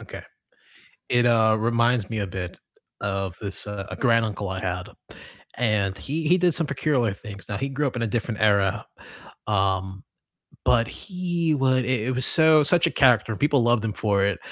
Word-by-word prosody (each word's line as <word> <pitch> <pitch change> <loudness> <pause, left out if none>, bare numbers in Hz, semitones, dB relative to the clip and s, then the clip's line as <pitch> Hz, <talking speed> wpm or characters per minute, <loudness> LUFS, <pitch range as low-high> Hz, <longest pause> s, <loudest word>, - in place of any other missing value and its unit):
okay. - - -10 0.9
It, 120 0 +2
uh, 110 -2 +3
reminds 115 -1 +1
me 110 - -3
a 100 - -3
bit 90 -1 -7 0.4
of 95 -2 -3
this, 100 -2 -3
uh 100 -1 -6
a - - -6
granduncle 110 -5 0
I 95 0 -4
had, 90 -1 -4 0.7
and 105 -5 0
he 155 +8 -4
he 180 +3 +4
did 175 -2 +2
some 165 -3 -1
peculiar 130 -5 0
things. 100 0 -11
Now, 100 - -4
he 135 +4 -3
grew 140 +2 -1
up 125 - -5
in 120 - -3
a 115 - 0
different 115 -1 -3
era, 100 -1 +1 0.6
um, 95 -2 -1 0.6
but 115 -1 +2
he 175 -4 -2
would 130 -2 +1
i - - -5
it 130 0 -1
was 130 +1 +3
so 160 -1 +7
such 170 +4 +3
a - - 0
character, 120 -5 +3
and 105 - -7
people 145 -3 +2
loved 120 -1 +1
him 110 - -2
for 100 -2 0
it. 100 -3 -1
115 Hz, 190 wpm, -23 LUFS, 100-135 Hz, 0.9 s, so